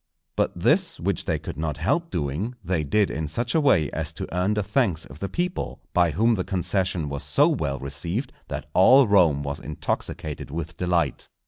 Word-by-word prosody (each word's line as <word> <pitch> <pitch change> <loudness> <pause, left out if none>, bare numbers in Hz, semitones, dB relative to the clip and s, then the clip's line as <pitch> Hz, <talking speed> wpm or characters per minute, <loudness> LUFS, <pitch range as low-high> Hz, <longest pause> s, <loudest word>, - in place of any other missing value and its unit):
But - - 0
this, - - +2
which - - -1
they - - 0
could - - -7
not 75 -1 -2
help 165 - 0
doing, 85 - -2
they 90 -3 0
did 100 +8 +2
in 80 0 -3
such 115 +10 -2
a 160 - +3
way 80 - +3
as 80 0 -3
to - - -5
earn 95 +4 +1
the 105 - 0
thanks 105 - 0
of - - -13
the 100 - -3
people, 180 +1 -3
by 90 -1 +4
whom 110 +10 +2
the 95 -4 0
concession 90 -3 -1
was 70 0 -4
so 145 +2 +3
well 75 - -1
received 85 - -3
that - - -5
all 130 +9 +7
Rome 85 -8 +4
was 70 0 -4
intoxicated 75 -3 -4
with 80 +2 -5
delight. 90 -1 0
90 Hz, 195 wpm, -25 LUFS, 75-105 Hz, -, all